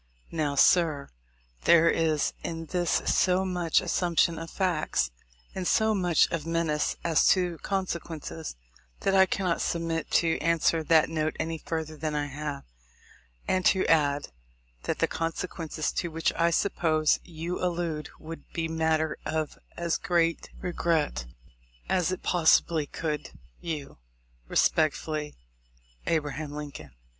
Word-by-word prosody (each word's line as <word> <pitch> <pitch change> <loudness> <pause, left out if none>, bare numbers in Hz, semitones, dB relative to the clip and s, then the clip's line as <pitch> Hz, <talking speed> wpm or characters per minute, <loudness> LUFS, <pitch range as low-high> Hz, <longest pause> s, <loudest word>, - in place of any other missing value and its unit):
Now, 150 -3 -1
sir, 155 -2 +4 0.6
there 170 -1 +6
is 160 -3 +2
in 165 -1 -4
this 175 0 -1 0.2
so 185 0 +3
much 180 -3 +2
assumption 170 -2 +1
of 165 0 -7
facts, 165 - 0 0.4
and 185 -2 -3
so 220 -1 +3
much 180 -5 +3
of 165 -3 -2
menace 165 -2 0
as 165 -2 +3
to 180 -3 +2
consequences, 170 -4 -4 0.5
that 195 - +1
I 190 0 +6
cannot 185 -4 0
submit 165 -1 -2
to 165 -1 +1
answer 165 0 +2
that 160 0 +4
note 155 -1 -1
any 160 0 -2
further 160 -1 -4
than 155 0 -3
1 145 -1 -1
have, 145 0 -5 0.8
and 185 0 +1
to 190 - +3
add, 145 -3 +2 0.6
that - - -1
the - - +3
consequences 165 -1 -3
to 175 - -2
which 165 0 0
I 170 +1 +2
suppose 160 -3 +2
you 170 +2 -5
allude 165 -4 -2
would 165 +1 -10
be 165 -1 -1
matter 160 -1 0
of 155 -1 -2 0.2
as 170 -1 0
great 170 -2 +1
regret 170 - 0
to - - -5
me - - -19 0.5
as 185 -2 +2
it 185 - -4
pos 170 -3 +3
sibly 160 -4 +3
could 150 -2 -3
to - - -10 0.3
you. 150 - -5 0.5
Respecefully, 155 -1 +1 0.7
A. 165 - +3
Lincoln. 145 - -6
165 Hz, 140 wpm, -28 LUFS, 155-175 Hz, 0.8 s, there